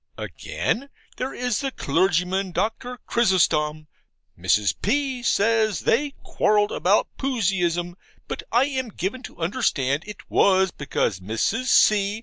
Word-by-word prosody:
Again, 275 +5 -3 0.3
there 260 +1 -3
is 250 +1 -2
the 275 -1 -1
clergyman, 180 - 0
Doctor 245 +5 -2
Chrysostom, 155 -8 +1 0.5
Mrs. 95 +4 +2
P. 265 +3 0
says 220 -2 +2
they 285 +4 +1
quarrelled 210 -1 +2
about 195 +4 +1
Puseyism, 180 -9 0 0.3
but - - -4
I 240 +3 +4
am 260 -4 -3
given 205 +6 -4
to - - -11
understand 160 - 0
it 210 -1 -10
was 190 -1 +3
because 125 -8 -2
Mrs. 110 - -1
C. 210 -3 +3
200 Hz, 125 wpm, -23 LUFS, 170-245 Hz, 0.5 s, I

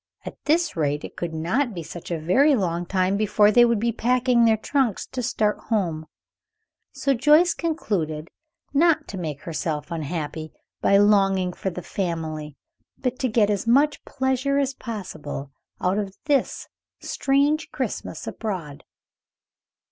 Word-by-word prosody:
At - - -6
this 330 +2 +2
rate 145 -2 0
it - - -8
could 175 -1 -4
not 220 - 0
be 170 - -5
such 170 +2 -9
a 170 - -1
very 265 - +4
long 175 -5 -1
time 185 +1 +1
before 210 0 +4
they 240 +3 +6
would 235 -2 +2
be 235 +2 +1
packing 245 +1 +2
their 220 -1 +4
trunks 245 -1 0
to 255 - -5
start 215 -3 0
home; 170 -8 -1 0.8
so 275 -1 0
Joyce 300 +8 +5
concluded 170 - -2 0.4
not 325 +2 +3
to 195 - -6
make 150 -5 -4
herself 155 -1 -3
unhappy 155 -1 -4 0.3
by 200 - +5
longing 195 -3 +3
for 190 - -3
the 180 -1 -7
family, 160 -5 -4 0.4
but 250 -1 -2
to 260 - +1
get 215 -2 +3
as 205 +2 -2
much 285 +5 +3
pleasure 265 +1 0
as 275 -1 +1
possible 160 - -6 0.3
out 185 +3 +1
of 195 -2 -4
this 285 -3 0 0.3
strange 285 +3 +1
Christmas - - -4
abroad. 180 -10 -5
205 Hz, 150 wpm, -24 LUFS, 170-260 Hz, 0.8 s, they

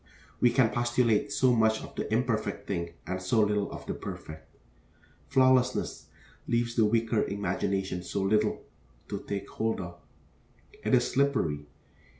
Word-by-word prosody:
We 120 - +5
can 120 -2 +3
postulate 120 -2 +1
so 130 -2 +3
much 110 -1 +2
of - - -10
the - - -4
imperfect 110 -3 0
thing 85 -3 -3
and 95 0 -3
so 95 +5 +1
little 105 -1 +1
of - - -8
the - - -3
perfect. 80 0 -8 0.8
Flawlessness 130 -1 +2 0.4
leaves 120 0 +1
the 115 -2 +4
weaker 115 0 +2
imagination 95 -2 -2
so 95 +2 -3
little 105 +2 +1 0.5
to - - -3
take 100 -1 -5
hold 110 0 -2
of: 85 -2 -7 0.8
it - - +3
is 120 - +3
slippery. 125 - +1
110 Hz, 145 wpm, -29 LUFS, 95-120 Hz, 0.8 s, We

